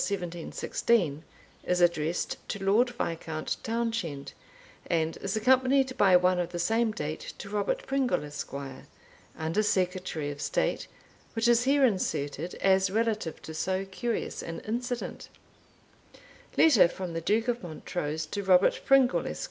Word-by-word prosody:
1716 175 Hz, -1 st, -1 dB, 0.4 s
is 180 Hz, 0 st, 0 dB
addressed 170 Hz, -1 st, +1 dB
to 200 Hz, -, -4 dB
Lord 215 Hz, +6 st, +4 dB
Viscount 165 Hz, -8 st, -3 dB
Townshend, 225 Hz, -11 st, -3 dB, 0.5 s
and 165 Hz, -1 st, 0 dB
is 195 Hz, +2 st, -3 dB
accompanied 260 Hz, +3 st, +3 dB
by 190 Hz, -3 st, +5 dB
one 180 Hz, 0 st, +4 dB
of 175 Hz, -1 st, -1 dB
the 175 Hz, -, -5 dB
same 225 Hz, +6 st, +1 dB
date 155 Hz, -5 st, -5 dB
to 200 Hz, -, -9 dB
Robert 205 Hz, -1 st, -1 dB
Pringle, 270 Hz, -, 0 dB
Esquire, 140 Hz, -2 st, -7 dB, 0.5 s
Under 160 Hz, +6 st, 0 dB
Secretary 180 Hz, -6 st, -1 dB
of 145 Hz, 0 st, -8 dB
State, -, -, -1 dB, 0.5 s
which 225 Hz, +1 st, +1 dB
is 240 Hz, +1 st, +4 dB
here 275 Hz, 0 st, +4 dB
inserted 170 Hz, -, -1 dB
as 190 Hz, 0 st, +3 dB
relative 215 Hz, -4 st, -1 dB
to 160 Hz, -, -7 dB
so 185 Hz, +4 st, -1 dB
curious 230 Hz, +5 st, -3 dB
an 165 Hz, 0 st, -6 dB
incident: 245 Hz, +2 st, -4 dB, 1.3 s
_Letter 235 Hz, -, +6 dB
from 185 Hz, -3 st, -5 dB
the 165 Hz, -, -3 dB
Duke 220 Hz, +7 st, +1 dB
of 245 Hz, 0 st, 0 dB
Montrose, 160 Hz, -2 st, -4 dB
to 200 Hz, +6 st, -4 dB
Robert 190 Hz, -1 st, +4 dB
Pringle, 270 Hz, -2 st, +4 dB
Esq. -, -, -5 dB
190 Hz, 140 wpm, -28 LUFS, 165-230 Hz, 1.3 s, Letter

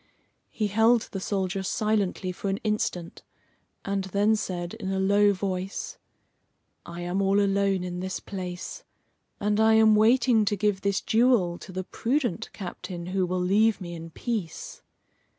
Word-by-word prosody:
He 215 Hz, -, -2 dB
held 225 Hz, +3 st, +3 dB
the 195 Hz, -, -4 dB
soldier 190 Hz, -1 st, -2 dB
silently 200 Hz, -2 st, 0 dB
for 195 Hz, +2 st, -4 dB
an 195 Hz, -, 0 dB
instant, 210 Hz, -5 st, -2 dB, 0.6 s
and 195 Hz, -1 st, -1 dB
then 205 Hz, +3 st, +2 dB
said 175 Hz, -4 st, -4 dB
in 220 Hz, -4 st, -5 dB
a 190 Hz, -, -1 dB
low 205 Hz, +1 st, +4 dB
voice: 190 Hz, 0 st, -4 dB, 0.9 s
"I 170 Hz, 0 st, -7 dB
am 175 Hz, +3 st, -1 dB
all 195 Hz, +1 st, +3 dB
alone 195 Hz, -2 st, +1 dB
in 180 Hz, 0 st, -4 dB
this 185 Hz, +1 st, -3 dB
place, 180 Hz, -3 st, -6 dB, 0.6 s
and 210 Hz, +1 st, +1 dB
I 220 Hz, 0 st, +5 dB
am 220 Hz, -1 st, +6 dB
waiting 230 Hz, +1 st, +4 dB
to 205 Hz, -, +1 dB
give 205 Hz, -1 st, 0 dB
this 200 Hz, -1 st, 0 dB
jewel 220 Hz, -7 st, +2 dB
to 190 Hz, -, -10 dB
the 185 Hz, 0 st, -4 dB
prudent 235 Hz, -, -1 dB
captain 175 Hz, -2 st, -7 dB
who 190 Hz, -2 st, +1 dB
will 180 Hz, +1 st, -1 dB
leave 210 Hz, +4 st, +3 dB
me 175 Hz, -3 st, -7 dB
in 165 Hz, 0 st, -8 dB
peace." 200 Hz, -2 st, -5 dB
195 Hz, 155 wpm, -26 LUFS, 185-215 Hz, 0.9 s, am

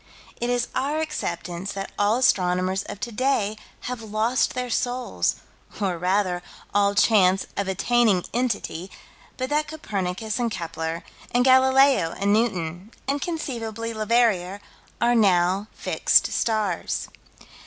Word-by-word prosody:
It 240 Hz, -, -2 dB
is 245 Hz, -1 st, +1 dB
our 290 Hz, +3 st, -1 dB
acceptance 175 Hz, -, -4 dB
that 195 Hz, 0 st, -5 dB
all 205 Hz, +3 st, +3 dB
astronomers 185 Hz, -5 st, +2 dB
of 200 Hz, -, -7 dB
today 235 Hz, -3 st, 0 dB, 0.3 s
have 250 Hz, -2 st, -5 dB
lost 220 Hz, +4 st, 0 dB
their 250 Hz, -1 st, -3 dB
souls, 245 Hz, +1 st, 0 dB, 0.4 s
or, 195 Hz, -4 st, 0 dB
rather, 180 Hz, 0 st, +1 dB, 0.3 s
all 200 Hz, 0 st, +3 dB
chance 190 Hz, -2 st, +4 dB
of 200 Hz, -, -2 dB
attaining 200 Hz, 0 st, +2 dB
Entity, 210 Hz, -7 st, -2 dB, 0.5 s
but 255 Hz, +2 st, -3 dB
that 300 Hz, +1 st, +1 dB
Copernicus 215 Hz, -7 st, -3 dB
and 240 Hz, -1 st, +1 dB
Kepler 165 Hz, -3 st, -4 dB, 0.3 s
and 245 Hz, +1 st, +2 dB
Galileo 260 Hz, -7 st, +5 dB
and 200 Hz, +1 st, +1 dB
Newton, 185 Hz, -4 st, -1 dB, 0.2 s
and, 280 Hz, +1 st, 0 dB
conceivably, 230 Hz, -9 st, -4 dB
Leverrier 215 Hz, -4 st, +1 dB, 0.4 s
are 240 Hz, +1 st, +3 dB
now 195 Hz, -2 st, +3 dB
fixed -, -, +2 dB
stars. 215 Hz, -6 st, -1 dB
215 Hz, 120 wpm, -24 LUFS, 185-245 Hz, 0.5 s, Galileo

